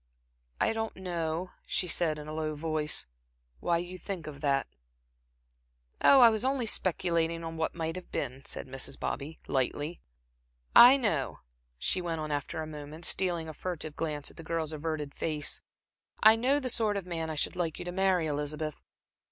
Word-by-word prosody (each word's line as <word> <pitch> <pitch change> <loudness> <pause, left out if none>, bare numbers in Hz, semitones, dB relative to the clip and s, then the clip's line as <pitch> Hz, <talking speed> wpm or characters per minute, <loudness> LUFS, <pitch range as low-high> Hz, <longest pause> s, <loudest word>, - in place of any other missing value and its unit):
"I - - +3
don't 225 0 -3
know," 175 -1 -3 0.2
she 180 - +1
said 165 -2 +1
in 150 0 -8
a 155 - -5
low 155 -1 -2
voice, 155 - -1 0.5
"why 170 - +2
you 175 +2 -5
think 185 -4 -5
of 145 -2 -8
that." 140 -2 +2 1.4
"Oh, 275 -2 +8
I 235 - +10
was 220 0 +1
only 260 -2 +1
speculating 170 -4 +1
on 165 0 -5
what 160 0 -1
might 165 0 -2
have 185 - -9
been," 135 0 -3
said - - -4
Mrs. 135 0 -3
Bobby, 145 +4 -4
lightly. 145 +5 -1 0.7
"I 250 +3 +11
know," 200 - -1 0.4
she 180 - +1
went 165 -2 -2
on 155 -1 -3
after 145 +2 -2
a - - -4
moment, 155 +1 -8
stealing 175 -4 +2
a 155 - -6
furtive 155 -2 -4
glance 150 -3 -3
at - - -22
the 165 - -8
girl's 160 -1 -2
averted 155 -2 -3
face, 150 -2 -2 0.6
"I 220 +1 +9
know 260 +5 +2
the 260 -3 -2
sort 215 -3 +1
of 195 - -4
man 165 -2 -3
I 155 - -3
should 145 - -1
like 170 -3 -1
you - - -6
to 175 - -3
marry, 190 -2 +2
Elizabeth. 150 +1 -3
165 Hz, 180 wpm, -30 LUFS, 150-185 Hz, 1.4 s, I